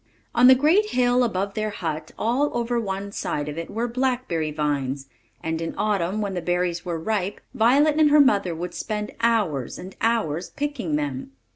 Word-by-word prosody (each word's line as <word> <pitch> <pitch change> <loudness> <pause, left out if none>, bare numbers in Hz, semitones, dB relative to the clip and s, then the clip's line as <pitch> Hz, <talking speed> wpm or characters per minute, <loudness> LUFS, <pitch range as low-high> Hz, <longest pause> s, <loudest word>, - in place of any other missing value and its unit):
On 245 +1 +6
the 260 - +9
great 335 +11 +3
hill 250 -3 +3
above 200 -3 -1
their 215 0 -1
hut, 160 -6 -4
all 255 +6 +1
over 240 0 0
one 200 -2 -4
side 145 -6 -3
of 150 - -4
it, 165 0 -5
were 230 +3 -2
blackberry 245 -10 -1
vines; 145 -3 -2 0.4
and 160 0 -2
in 165 - -4
autumn, 205 -1 0
when 200 -2 -2
the 180 - -2
berries 175 0 -1
were 170 -2 -3
ripe, 200 +2 -2
Violet 285 +7 +4
and 305 -1 +6
her 300 +1 +6
mother 200 - +3
would 175 +2 -5
spend 210 -1 -4
hours 205 - +1
and 185 +2 -9
hours 210 -8 0
picking 280 - -3
them. 135 -3 -3
200 Hz, 180 wpm, -24 LUFS, 165-240 Hz, 0.4 s, the